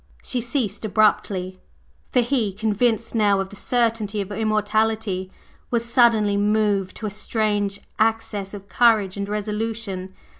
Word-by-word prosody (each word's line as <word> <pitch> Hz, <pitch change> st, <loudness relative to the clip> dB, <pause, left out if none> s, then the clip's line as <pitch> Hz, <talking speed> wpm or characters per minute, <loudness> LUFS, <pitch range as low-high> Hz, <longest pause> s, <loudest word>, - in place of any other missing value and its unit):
…" -, -, -30 dB
She 250 Hz, -, -2 dB
ceased 230 Hz, -4 st, -2 dB
abruptly, 200 Hz, -3 st, +1 dB, 0.5 s
for 250 Hz, -, +4 dB
he, 235 Hz, -5 st, 0 dB
convinced 220 Hz, +2 st, 0 dB
now 205 Hz, -3 st, +3 dB
of 195 Hz, 0 st, -3 dB
the 205 Hz, -, -12 dB
certainty 225 Hz, -2 st, 0 dB
of 200 Hz, 0 st, -4 dB
Immortality, 215 Hz, -2 st, 0 dB, 0.4 s
was 235 Hz, -1 st, 0 dB
suddenly 230 Hz, -4 st, +3 dB
moved 205 Hz, -2 st, +1 dB
to 220 Hz, -, -6 dB
a 210 Hz, -, -2 dB
strange 205 Hz, -1 st, -1 dB, 0.2 s
access 215 Hz, -3 st, 0 dB
of 200 Hz, -1 st, -10 dB
courage 215 Hz, -5 st, +3 dB
and 200 Hz, 0 st, -4 dB
resolution. 210 Hz, -2 st, -3 dB
210 Hz, 140 wpm, -23 LUFS, 200-225 Hz, 0.5 s, for